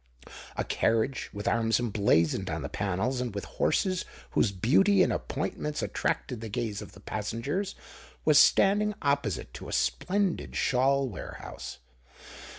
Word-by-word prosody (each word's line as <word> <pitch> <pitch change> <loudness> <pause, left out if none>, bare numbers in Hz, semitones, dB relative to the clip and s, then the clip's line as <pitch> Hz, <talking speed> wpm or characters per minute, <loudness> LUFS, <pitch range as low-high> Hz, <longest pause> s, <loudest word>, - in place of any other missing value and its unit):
A - - +1
carriage, 115 +4 0
with 105 0 -5
arms 115 0 +2
emblazoned 100 -6 +2
on 80 -2 -3
the 70 - -4
panels, 105 +6 -1
and 120 -5 -4
with 100 - -3
horses 185 -1 0 0.3
whose 100 - +2
beauty 185 - +4
and - - +1
appointments 150 +1 -3
attracted 125 -4 -2
the 115 - -5
gaze 105 0 -3
of - - -10
the 100 - -14
passengers, 115 - -3 0.5
was - - +7
standing 210 +1 +4
opposite 140 - 0
to - - -8
a - - -6
splendid 180 - 0
shawl 135 +1 +2
warehouse. 95 - -8
120 Hz, 140 wpm, -29 LUFS, 100-145 Hz, 0.5 s, was